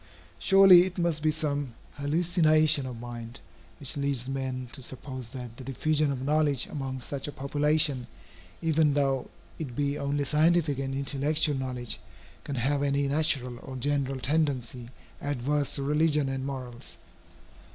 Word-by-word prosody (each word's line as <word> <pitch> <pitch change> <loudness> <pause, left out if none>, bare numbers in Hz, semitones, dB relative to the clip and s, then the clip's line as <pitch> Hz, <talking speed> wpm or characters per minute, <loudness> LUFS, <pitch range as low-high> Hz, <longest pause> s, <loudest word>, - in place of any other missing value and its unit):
Surely 190 - +8
it 185 - -9
must 170 -3 +1
be 155 - +2
some 145 -5 -1 0.2
hallucination 155 -1 +3
of 120 -3 -7
mind, 120 -1 -8 0.4
which 140 - +3
leads 140 -3 -1
men 130 -2 -3
to 135 - -8
suppose 130 -1 -6
that 125 -2 -8
the - - -8
diffusion 150 +3 0
of 130 -1 -4
knowledge 145 -2 +2
among 135 -2 -5
such 135 +3 -4
a - - -4
population, 145 -2 +1 0.6
even 155 -2 +3
though 135 -2 0 0.3
it 135 -7 -5
be 140 +1 -1
only 140 0 -1
scientific 155 0 +2
and 135 0 -3
intellectual 145 +2 +1
knowledge, 125 -3 -3 0.4
can 140 - -5
have 140 +3 0
any 140 0 +1
natural 135 -4 0
or 130 - -9
general 135 0 -1
tendency 130 -5 -1 0.3
adverse 145 +1 -1
to 140 - -2
religion 150 0 +2
and 135 0 -3
morals. 125 -8 -7
140 Hz, 145 wpm, -28 LUFS, 130-150 Hz, 0.6 s, Surely